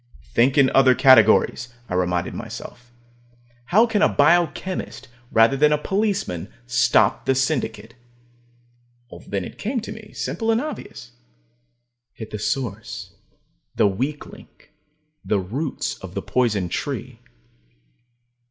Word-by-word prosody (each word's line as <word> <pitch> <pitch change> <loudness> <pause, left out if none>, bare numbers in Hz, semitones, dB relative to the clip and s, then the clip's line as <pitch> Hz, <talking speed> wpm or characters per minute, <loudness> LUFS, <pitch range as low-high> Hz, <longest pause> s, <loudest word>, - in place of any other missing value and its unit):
Think 130 +4 +3
in 135 -2 +5
other 130 -1 +5
categories, 125 -1 +5 0.2
I - - -6
reminded 90 -1 -1
myself. 120 0 -9 0.7
How 215 - +4
can 220 -3 0
a 210 - +5
biochemist, 165 -1 0 0.2
rather 115 +4 +4
than 150 +2 +3
a 150 - +3
policeman, 150 - -2
stop 120 0 +2
the 135 - +3
Syndicate? 130 -5 -2 1.3
Then 100 -3 -3
it - - -11
came 240 +4 -2
to 215 - -8
me, 215 -1 -11
simple 225 - -3
and 225 0 +3
obvious. 300 - -7 1.0
Hit 110 -1 -9
the 105 - -5
source, 115 -2 -4 0.6
the - - +3
weak 130 +10 -2
link, - - -16 0.5
the 105 - 0
roots 130 - -4
of - - -10
the - - -3
poison 110 -7 0
tree. 85 - -5
130 Hz, 125 wpm, -22 LUFS, 110-170 Hz, 1.3 s, in